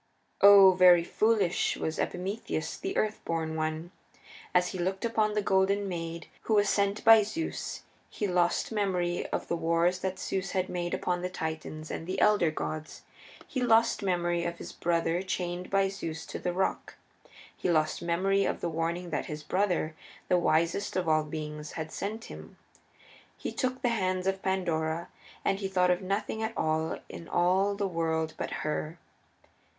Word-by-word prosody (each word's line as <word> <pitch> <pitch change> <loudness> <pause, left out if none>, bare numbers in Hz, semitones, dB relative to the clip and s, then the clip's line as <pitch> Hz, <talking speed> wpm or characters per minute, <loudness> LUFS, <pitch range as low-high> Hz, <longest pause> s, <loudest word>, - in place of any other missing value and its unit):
Oh, 200 -1 +9
very 180 -2 +6
foolish 210 -1 +1
was 160 - -3
Epimetheus 185 -2 -3
the 385 +1 -4
Earth 215 0 0
born 160 -1 -2
One! 155 +2 -3 0.6
As 180 0 +3
he 185 - -6
looked 190 +4 -1
upon 215 -2 +1
the 210 - +1
Golden 195 +1 +2
Maid 170 -2 -5 0.2
who 220 - +2
was 205 -1 +4
sent 200 0 +1
by 225 -1 +9
Zeus 270 +11 -4 0.3
he 210 - -3
lost 180 0 +1
memory 180 -5 0
of - - -3
the - - 0
wars 170 +2 +1
that 190 0 -3
Zeus 190 0 -3
had 185 0 0
made 175 -1 -2
upon 180 -1 -1
the 180 - -2
Titans 160 -2 -5
and 165 - -5
the 190 +1 -2
Elder 210 -6 +4
Gods; 155 0 -5 0.4
he 260 - -3
lost 230 -1 +3
memory 175 -3 0
of 170 0 -3
his - - -8
brother 170 0 0
chained 180 -1 -3
by 195 0 +3
Zeus 180 -5 -5
to - - -6
the 180 - -1
rock; 190 +2 -2 0.6
he - - -2
lost 155 -2 +1
memory 190 +4 +1
of - - -1
the 170 - -2
warning 165 +2 -2
that 145 - -2
his 150 0 -6
brother, 180 -3 0 0.4
the 180 - +4
wisest 170 +4 +1
of 185 -2 0
all 155 -1 +3
beings, 150 0 -6
had 160 -1 -5
sent 220 +3 -4
him. - - -11 0.8
He - - -4
took 255 0 -2
the 245 - +3
hands 185 -5 0
of 195 0 0
Pandora, 170 -3 -1 0.4
and 195 - +1
he 195 - -2
thought 180 -1 +2
of 180 +2 0
nothing 200 +3 -2
at 220 +1 -3
all 160 +1 0
in 165 - -9
all 190 +3 +2
the 200 0 -1
world 160 -2 -1
but - - -4 0.2
her. 155 +2 -2
180 Hz, 175 wpm, -29 LUFS, 165-195 Hz, 0.8 s, Oh